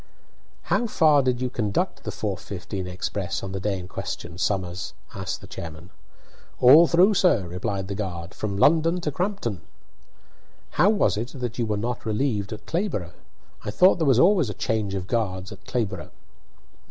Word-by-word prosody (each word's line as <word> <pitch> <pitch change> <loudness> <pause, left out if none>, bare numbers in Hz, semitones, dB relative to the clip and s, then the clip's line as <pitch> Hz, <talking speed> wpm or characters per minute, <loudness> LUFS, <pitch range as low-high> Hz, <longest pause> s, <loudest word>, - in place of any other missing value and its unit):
"How 240 - +1
far 155 -8 +4
did 125 -2 0
you 125 -1 -1
conduct 105 -5 -1
that - - -2
4:15 95 -2 -4
express 90 +1 -3
on 95 - -4
the 95 - -3
day 100 0 -1
in 90 -1 -7
question, 90 -3 -6
Somers?" 95 -2 -2 0.2
asked 95 -3 -4
the - - -10
chairman. 80 +2 -8 0.7
"All 150 +7 +8
through, 180 +6 +5
sir," 175 - +3
replied 95 +2 -3
the 100 - -3
guard, 95 -3 -5
"from 100 -2 -3
London 165 - +4
to 150 - -1
Crampton." 145 - -2 1.1
"How 195 - +4
was 210 - +2
it 120 +4 -4
that 120 -1 -4
you 115 - 0
were 105 -1 0
not 120 +3 -3
relieved 110 -2 -1
at 110 -1 -7
Clayborough? 160 - -2 0.5
I - - -4
thought 180 - +5
there 160 - +1
was 130 -4 +5
always 175 - +4
a 105 - -5
change 105 -3 -1
of 95 -2 -3
guards 95 -4 -2
at - - -12
Clayborough." 115 -5 -2
105 Hz, 170 wpm, -25 LUFS, 95-140 Hz, 1.1 s, All